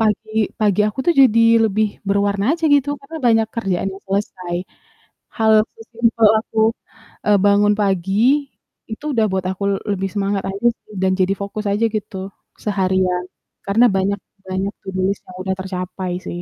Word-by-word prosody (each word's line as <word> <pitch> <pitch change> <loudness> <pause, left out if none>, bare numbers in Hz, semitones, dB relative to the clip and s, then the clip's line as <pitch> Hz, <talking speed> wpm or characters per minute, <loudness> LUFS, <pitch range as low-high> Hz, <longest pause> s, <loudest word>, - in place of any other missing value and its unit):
pagi 220 0 0
pagi 210 -1 +2
aku 210 - -9
tuh 345 - +5
jadi 230 -3 +6 0.3
lebih 210 +1 -1
berwarna 200 +5 +1
aja 330 - -5
gitu, 285 0 +2
karena 300 +4 -9
banyak 225 -1 +4
kerjaan 195 -3 -1
yang 195 - -11
selesai. 185 -3 -2 0.8
Hal 220 -1 +3 0.2
sesimpel 230 -1 +2
aku, 220 0 -3 0.7
eee, 205 -1 +5
bangun 205 +1 +4
pagi 205 +9 +2 0.4
itu 250 +7 -7
udah 225 -2 +3
buat 190 -1 -1
aku 190 +2 -6
l - - +1 0.2
lebih 195 0 -2
semangat 200 -1 -1
aja 200 +5 0
sih 215 - -19
dan 190 - +2
jadi 185 +1 +2
fokus 210 +1 -5
aja 215 +3 +1
gitu 210 -1 -4 0.5
seharian 185 -3 0 0.4
karena 220 +5 +4
banyak 195 +1 +1 0.3
banyak 190 +2 -2
to 195 - -7
do 185 - 0
list 200 - -2
yang 185 - -10
udah 190 - 0
tercapai 185 -1 -4 0.2
sih. 175 - -5
200 Hz, 165 wpm, -19 LUFS, 190-220 Hz, 0.8 s, jadi